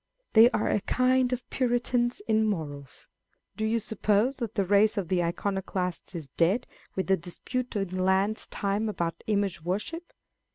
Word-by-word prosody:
They 225 +2 +8
are - - 0
a 210 - +1
kind 255 +2 +2
of 250 0 -3
Puritans 245 +4 0
in 220 0 +3
morals. 145 -8 -5 0.5
Do 220 - -3
you 225 +1 +2
suppose 220 +4 +1
that 230 -4 -4
the 200 - +1
race 205 +3 +4
of 185 -4 -2
the 180 -2 +2
Iconoclasts 185 0 -3
is 155 -5 -6
dead 180 - +1 0.3
with 190 - -1
the 190 0 +3
dispute 240 +9 -5
in 185 -2 -1
Laud's 190 +3 +1
time 205 +2 -1
about 170 -5 -3
image 200 -4 0
worship 210 - -4
205 Hz, 160 wpm, -28 LUFS, 185-235 Hz, 0.5 s, They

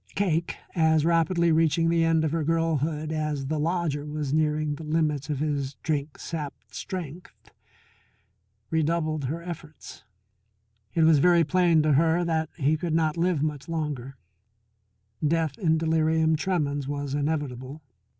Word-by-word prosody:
Cake, 170 -4 0 0.2
as 160 -2 +3
rapidly 170 0 +2
reaching 165 +1 +3
the 165 0 +3
end 165 -1 +2
of 155 - -1
her 165 -1 0
girlhood 155 -1 0
as 150 -3 -2
the 155 +3 -2
lodger 160 -2 -1
was 150 -2 -3
nearing 155 -1 +1
the 145 - -7
limits 150 -2 0
of 150 - -1
his 140 -2 -2
drink 150 -1 -2
sapped 150 -4 -7
strength, 180 -2 -7 1.2
redoubled 155 -2 0
her 165 +6 -4
efforts. 165 -3 -9 0.9
It 165 - +4
was 160 -2 +6
very 170 +2 +5
plain 170 -1 +3
to 155 -1 +3
her 165 +4 +3
that 160 -2 0
he 150 0 +2
could 160 0 -2
not 155 -2 +1
live 170 -3 +1
much 150 -1 -3
longer; 145 -5 -4 1.1
death 160 -1 +1
in 160 -5 +2
delirium 160 0 +2
tremens 145 -5 -1
was 145 -1 -3
inevitable. 145 -1 -3
155 Hz, 140 wpm, -26 LUFS, 150-165 Hz, 1.2 s, was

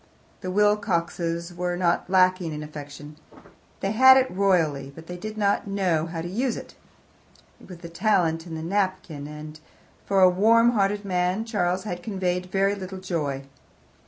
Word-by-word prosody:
The 185 - -5
Wilcoxes 175 -4 0
were 175 0 -2
not 175 0 0
lacking 185 -3 +3
in 150 0 -5
affection; 150 0 -10 0.6
they 195 - -1
had 260 +4 +8
it 260 -1 +2
royally, 165 -8 +1
but 165 - -11
they 180 - -7
did 215 +4 -7
not 200 -1 +1
know 180 -5 0
how 165 -1 -5
to - - -4
use 235 +6 -1
it. - - -10 0.9
It - - -16
was 180 - -9
the 170 0 -10
talent 170 -3 0
in 165 - -6
the 160 - -5
napkin, 185 -5 -2
and, 150 0 -9 0.4
for 195 -1 +1
a 185 - +8
warm 225 +6 +4
hearted 205 -2 0
man, 180 +3 0
Charles 190 -5 -1
had 175 -4 -5
conveyed 180 -2 -2
very 195 +2 +1
little 190 -1 -7
joy. 155 -7 -3
180 Hz, 165 wpm, -25 LUFS, 165-200 Hz, 0.9 s, had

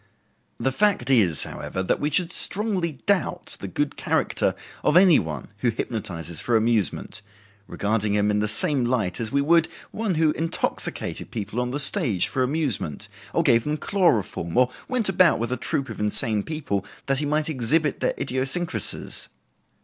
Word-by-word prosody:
The 135 - 0
fact 180 -6 +1
is, 95 - +3
however, 95 - -5
that - - 0
we 145 - 0
should 170 +3 +2
strongly 195 -6 0
doubt 200 -4 -1
the - - -6
good - - -2
character - - 0 0.3
of 150 - +4
any 180 -4 +6
one 80 -1 -6
who 120 - +1
hypnotizes 95 - -5
for 120 -2 +1
amusement, 110 -2 0 0.5
regarding 105 0 -1
him 105 0 +2
in 105 - +1
the 105 - 0
same 125 +5 +2
light 115 -7 -1
as 115 -2 -3
we 140 - +2
would 165 +2 +4 0.2
one 210 -4 -2
who 155 -1 +3
intoxicated 165 +2 -3
people 110 +1 -5
on 125 - -2
the 140 +3 -3
stage 140 - +5
for 130 - -2
amusement, 130 - +1 0.2
or - - +1
gave 115 -1 +4
them 150 +1 -2
chloroform, 120 - 0
or 125 0 +4 0.2
went 250 -4 +1
about 185 -1 +4
with 120 +2 -3
a - - +1
troup 135 +2 -2
of 110 - -8
insane 105 0 +5
people 130 - -3 0.2
that 135 -1 0
he 150 - -2
might 150 +1 0
exhibit 150 +1 0
their - - -1
idiosyncrasies. 135 +7 -3
130 Hz, 170 wpm, -24 LUFS, 105-160 Hz, 0.5 s, any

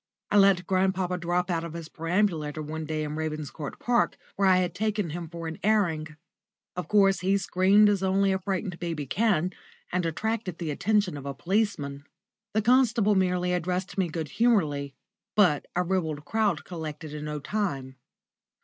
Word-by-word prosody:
I 205 - +4
let 195 -3 +5
grandpapa 185 -1 +1
drop 175 +1 0
out 165 -1 0
of 170 -1 -6
his 165 -1 -6
perambulator 165 -3 -1
one 155 +1 -5
day 155 0 -2
in 150 0 -4
Ravenscourt 155 -2 -4
Park, 240 0 +1 0.2
where 195 0 +2
I 185 -1 +6
had 180 -2 0
taken 210 -4 -1
him 170 0 -5
for 170 0 -7
an 160 - -6
airing. 165 -8 +1 0.6
Of 180 - -4
course, 195 -2 +4
he 195 +2 +2
screamed 195 +2 +4
as 205 -2 +2
only 195 +1 +2
a 190 - 0
frightened 190 -1 -3
baby 165 -4 -3
can, 185 - +1 0.4
and 180 0 0
attracted 190 +2 -2
the 165 -3 -3
attention 205 0 +1
of 140 0 -7
a 140 - -4
policeman. 175 - -1 0.5
The 215 - +2
constable 235 -3 +4
merely 180 -2 +1
addressed 180 +2 -2
me 190 -2 +1
good 160 -2 -4
humouredly, 150 - +1 0.4
but 180 -9 +3
a 180 - +2
ribald 160 -5 -2
crowd 220 +3 0
collected 155 -3 -6
in 150 0 -5
no 150 0 -3
time. 140 -8 -3
180 Hz, 170 wpm, -27 LUFS, 155-200 Hz, 0.6 s, I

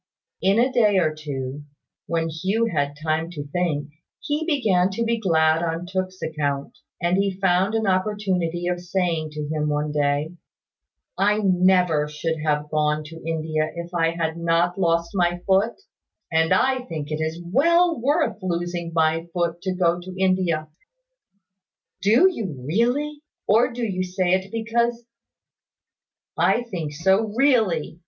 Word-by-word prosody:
In 195 +2 +3
a 255 +3 +2
day 210 -4 +4
or 160 -4 +2
two, 140 -2 -5 0.5
when 165 -1 0
Hugh 190 +8 0
had 150 -10 0
had 145 0 -15
time 160 +1 0
to 145 -3 -6
think, 150 -3 -1 0.3
he 295 +2 -2
began 205 - +2
to 200 +4 -2
be 230 0 0
glad 160 -5 +3
on 165 +1 -2
Tooke's 185 0 -4
account; 145 -3 -2 0.2
and 175 +1 +1
he 195 -1 0
found 190 +2 +2
an 220 -1 0
opportunity 185 -3 0
of 175 0 -1
saying 175 -3 -1
to 150 -1 -4
him 150 -1 -1
one 150 0 -1
day, 145 +2 0 0.9
"I 205 +2 +3
never 180 -5 +3
should 155 +2 -3
have 150 -1 -1
gone 150 0 +1
to 155 +2 -11
India 155 -1 -1
if 170 +1 -7
I 165 -1 +1
had 165 -1 -2
not 170 +1 +1
lost 170 -1 +1
my 175 -2 +1
foot; 200 - +2 0.5
and 160 0 +2
I 260 0 +3
think 155 -3 -6
it 155 +1 -2
is 160 +1 -2
well 330 - +2
worth 285 -3 +1
while 185 -3 -1
losing 175 -1 -4
my 160 +1 +2
foot 170 -1 -1
to 190 -1 -2
go 175 -1 +2
to 185 +1 -9
India." 185 -5 +1 1.3
"Do 225 - +5
you 200 - -3
really? 260 - 0 0.3
Or 235 +5 +4
do 240 0 -3
you 185 -3 -2
say 180 0 -1
it 190 +1 0
because 235 +1 -1 0.7
" - - -68
"I 240 - +2
think 175 -10 -5
so 190 +7 +2
really." 220 - +2
175 Hz, 160 wpm, -23 LUFS, 160-200 Hz, 1.3 s, Do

